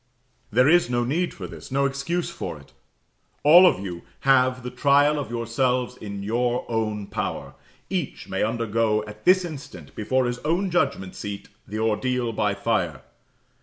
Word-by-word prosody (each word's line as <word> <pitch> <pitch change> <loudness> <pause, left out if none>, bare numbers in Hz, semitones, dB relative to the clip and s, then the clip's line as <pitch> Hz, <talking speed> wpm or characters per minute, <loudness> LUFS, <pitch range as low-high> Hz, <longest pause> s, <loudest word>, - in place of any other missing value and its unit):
There 125 +5 +4
is 175 -4 +4
no 120 -1 +1
need 165 +9 0
for 95 - -8
this 80 +1 -10
no 140 +1 +2
excuse 150 +6 -2
for 80 - -6
it. 70 -2 -19 0.7
All 175 +5 +9
of 135 - +2
you 90 -3 -6 0.2
have 130 -2 +3
the 125 - -5
trial 145 +3 +3
of 140 - -5
yourselves 125 +2 -1
in 100 -4 -7
your 120 +3 0
own 110 -3 -2
power; - - -4 0.3
each - - -4
may - - -2
undergo 110 -1 +1
at 105 0 -12
this 185 0 +5
instant, 135 - -9
before 130 +5 0
his 120 0 -2
own 175 +6 0
judgment 140 - 0
seat, 100 -1 -7 0.2
the 105 - -5
ordeal 115 +2 0
by 105 -2 0
fire. 90 - -1
120 Hz, 165 wpm, -24 LUFS, 105-140 Hz, 0.7 s, All